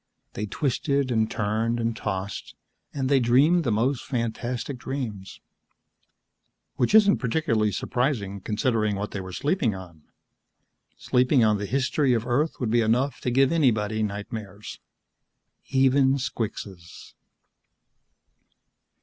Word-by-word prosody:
They 105 Hz, -, -4 dB
twisted 140 Hz, +3 st, -1 dB
and 110 Hz, -2 st, +1 dB
turned 115 Hz, +2 st, -1 dB
and 115 Hz, -1 st, -1 dB
tossed, 95 Hz, -1 st, -5 dB, 0.4 s
and 135 Hz, -2 st, -2 dB
they 140 Hz, 0 st, +4 dB
dreamed 140 Hz, +9 st, +4 dB
the 120 Hz, -, 0 dB
most 120 Hz, +5 st, 0 dB
fantastic 120 Hz, +1 st, -3 dB
dreams 120 Hz, -8 st, -5 dB, 1.4 s
Which 125 Hz, -, +2 dB
isn't 205 Hz, -2 st, +6 dB
particularly 115 Hz, -5 st, 0 dB
surprising, 100 Hz, -2 st, -2 dB
considering 110 Hz, 0 st, 0 dB
what 100 Hz, +2 st, -4 dB
they 95 Hz, -, -4 dB
were 95 Hz, 0 st, -8 dB
sleeping 140 Hz, -, 0 dB
on. 85 Hz, -4 st, -11 dB, 1.0 s
Sleeping 125 Hz, 0 st, +2 dB
on 105 Hz, -2 st, +3 dB
the 100 Hz, -, -4 dB
history 135 Hz, +2 st, +1 dB
of 115 Hz, 0 st, -2 dB
Earth 140 Hz, +6 st, 0 dB
would 120 Hz, -4 st, -1 dB
be 120 Hz, 0 st, +3 dB
enough 125 Hz, +5 st, 0 dB
to -, -, -1 dB
give 135 Hz, +2 st, +3 dB
anybody 110 Hz, -9 st, +1 dB
nightmares. 105 Hz, 0 st, -6 dB, 0.9 s
Even 135 Hz, 0 st, +3 dB
squixes. 100 Hz, -8 st, -6 dB
120 Hz, 120 wpm, -25 LUFS, 105-135 Hz, 1.4 s, isn't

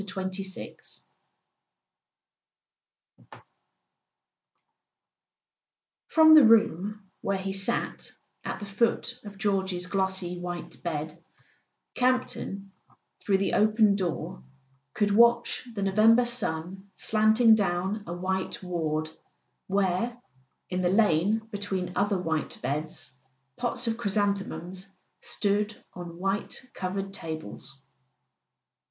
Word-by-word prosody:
XXVI 190 Hz, -1 st, -6 dB, 2.3 s
F -, -, -14 dB, 2.8 s
ROM 315 Hz, 0 st, +9 dB
the 310 Hz, -2 st, +10 dB
room 210 Hz, -2 st, +3 dB
where 200 Hz, 0 st, 0 dB
he 190 Hz, 0 st, -4 dB
sat 195 Hz, +5 st, -1 dB, 0.3 s
at -, -, -4 dB
the 205 Hz, -, -6 dB
foot 230 Hz, +4 st, 0 dB
of 205 Hz, -1 st, -10 dB
George's 190 Hz, -3 st, 0 dB
glossy 190 Hz, -2 st, -1 dB
white 175 Hz, -1 st, -6 dB
bed, 160 Hz, 0 st, -4 dB, 0.7 s
Campton, 245 Hz, -6 st, -1 dB, 0.5 s
through 195 Hz, -2 st, +2 dB
the 195 Hz, -, -1 dB
open 215 Hz, -1 st, +4 dB
door, 180 Hz, -1 st, -3 dB, 0.5 s
could 205 Hz, -1 st, +2 dB
watch 235 Hz, +3 st, +4 dB
the 200 Hz, -, -2 dB
November 220 Hz, +5 st, +5 dB
sun 190 Hz, -5 st, -2 dB
slanting 220 Hz, +1 st, +5 dB
down 195 Hz, 0 st, 0 dB
a 170 Hz, -, -4 dB
white 190 Hz, +2 st, -2 dB
ward 155 Hz, -3 st, -2 dB, 0.6 s
where, 200 Hz, +5 st, 0 dB, 0.5 s
in 180 Hz, 0 st, 0 dB
the 175 Hz, -, +2 dB
lane 210 Hz, +2 st, +2 dB
between 195 Hz, -3 st, -3 dB
other 200 Hz, -1 st, +1 dB
white 160 Hz, -4 st, -2 dB
beds, 150 Hz, +2 st, -3 dB, 0.4 s
pots 245 Hz, 0 st, -2 dB
of 225 Hz, -1 st, -1 dB
chrysanthemums 195 Hz, -3 st, -2 dB, 0.3 s
stood 205 Hz, +1 st, -1 dB, 0.2 s
on 175 Hz, -1 st, -8 dB
white 195 Hz, +2 st, -2 dB
covered 195 Hz, +1 st, -4 dB
tables. 155 Hz, -, -7 dB
195 Hz, 100 wpm, -27 LUFS, 180-215 Hz, 2.8 s, the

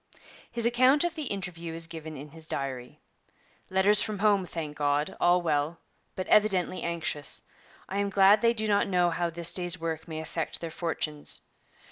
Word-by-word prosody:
His 235 Hz, -1 st, -1 dB
account 255 Hz, +5 st, +4 dB
of 345 Hz, -, -1 dB
the 310 Hz, -2 st, -5 dB
interview 170 Hz, -5 st, -5 dB
is 165 Hz, 0 st, -1 dB
given 160 Hz, -2 st, -8 dB
in 145 Hz, +3 st, -9 dB
his 160 Hz, +1 st, -9 dB
diary: 130 Hz, -4 st, -4 dB, 0.7 s
'Letters 200 Hz, +2 st, +5 dB
from 215 Hz, -1 st, -2 dB
home; 200 Hz, -2 st, +2 dB
thank 155 Hz, -3 st, -5 dB
God, 145 Hz, 0 st, 0 dB
all 175 Hz, 0 st, +3 dB
well, 155 Hz, 0 st, 0 dB, 0.4 s
but 185 Hz, -, -3 dB
evidently 190 Hz, -4 st, +3 dB
anxious. 165 Hz, -4 st, -3 dB, 0.4 s
I 195 Hz, -, -3 dB
am 200 Hz, 0 st, 0 dB
glad 200 Hz, +2 st, +5 dB
they 235 Hz, 0 st, +3 dB
do 220 Hz, -1 st, -1 dB
not 205 Hz, -1 st, +2 dB
know 180 Hz, -2 st, +2 dB
how 170 Hz, +1 st, -1 dB
this 170 Hz, +1 st, -1 dB
day's 175 Hz, -1 st, +1 dB
work 160 Hz, -1 st, -4 dB
may 160 Hz, -1 st, -5 dB
affect 160 Hz, 0 st, -3 dB
their 165 Hz, -1 st, -6 dB
fortunes. 155 Hz, -3 st, -1 dB
170 Hz, 175 wpm, -28 LUFS, 160-200 Hz, 0.7 s, Letters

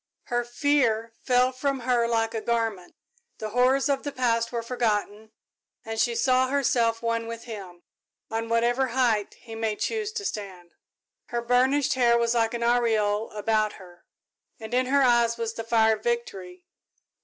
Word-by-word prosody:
Her 240 Hz, -1 st, -1 dB
fear 240 Hz, -3 st, +1 dB
fell 250 Hz, 0 st, +3 dB
from 270 Hz, +1 st, -2 dB
her 240 Hz, -1 st, +1 dB
like 225 Hz, -1 st, 0 dB
a 225 Hz, -, -3 dB
garment, 225 Hz, -6 st, -2 dB, 0.4 s
the 215 Hz, -, -5 dB
horrors 255 Hz, +4 st, +3 dB
of 275 Hz, -1 st, 0 dB
the 285 Hz, -, -5 dB
past 230 Hz, -3 st, 0 dB
were 235 Hz, -1 st, -3 dB
forgotten, 220 Hz, -3 st, -2 dB, 0.6 s
and 225 Hz, 0 st, -4 dB
she 235 Hz, 0 st, +1 dB
saw 255 Hz, +1 st, +2 dB
herself 240 Hz, -4 st, +1 dB
one 230 Hz, 0 st, -1 dB
with 230 Hz, 0 st, -7 dB
him, 190 Hz, -7 st, -9 dB, 0.5 s
on 225 Hz, 0 st, -3 dB
whatever 240 Hz, +3 st, +2 dB
height 225 Hz, -5 st, +1 dB
he 225 Hz, -, -12 dB
might 225 Hz, -1 st, -2 dB
choose 440 Hz, -1 st, -2 dB
to 415 Hz, -3 st, -4 dB
stand. 185 Hz, -, -6 dB, 0.5 s
Her 240 Hz, -1 st, -3 dB
burnished 255 Hz, +3 st, +2 dB
hair 240 Hz, -2 st, +3 dB
was 235 Hz, 0 st, +1 dB
like 230 Hz, 0 st, +1 dB
an 235 Hz, -, -3 dB
aureole 225 Hz, -3 st, +1 dB
about 215 Hz, 0 st, 0 dB
her, 175 Hz, -2 st, -15 dB, 0.6 s
and 220 Hz, +1 st, -8 dB
in 255 Hz, +1 st, +2 dB
her 280 Hz, +1 st, +3 dB
eyes 235 Hz, -2 st, +3 dB
was 230 Hz, -1 st, -3 dB
the 225 Hz, -, -5 dB
fire 225 Hz, -1 st, +3 dB
of -, -, -20 dB
victory. 440 Hz, -7 st, -4 dB
235 Hz, 165 wpm, -26 LUFS, 225-255 Hz, 0.6 s, fell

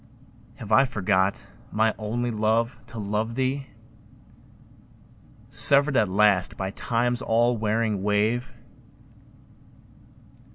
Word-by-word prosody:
Have 110 Hz, -1 st, -10 dB
I 135 Hz, +5 st, +5 dB
forgot, 100 Hz, -6 st, -1 dB, 0.3 s
my 110 Hz, +1 st, +1 dB
only 120 Hz, +3 st, -3 dB
love, 115 Hz, +3 st, 0 dB
to 115 Hz, -, -11 dB
love 110 Hz, +2 st, -3 dB
thee, 135 Hz, +1 st, -2 dB, 1.8 s
Severed 140 Hz, +4 st, +5 dB
at 110 Hz, -5 st, +2 dB
last 100 Hz, -1 st, +2 dB
by 95 Hz, 0 st, -4 dB
Time's 120 Hz, +3 st, -1 dB
all 120 Hz, +1 st, +1 dB
wearing 110 Hz, -2 st, -1 dB
wave? 105 Hz, +5 st, 0 dB
110 Hz, 95 wpm, -24 LUFS, 105-120 Hz, 1.8 s, I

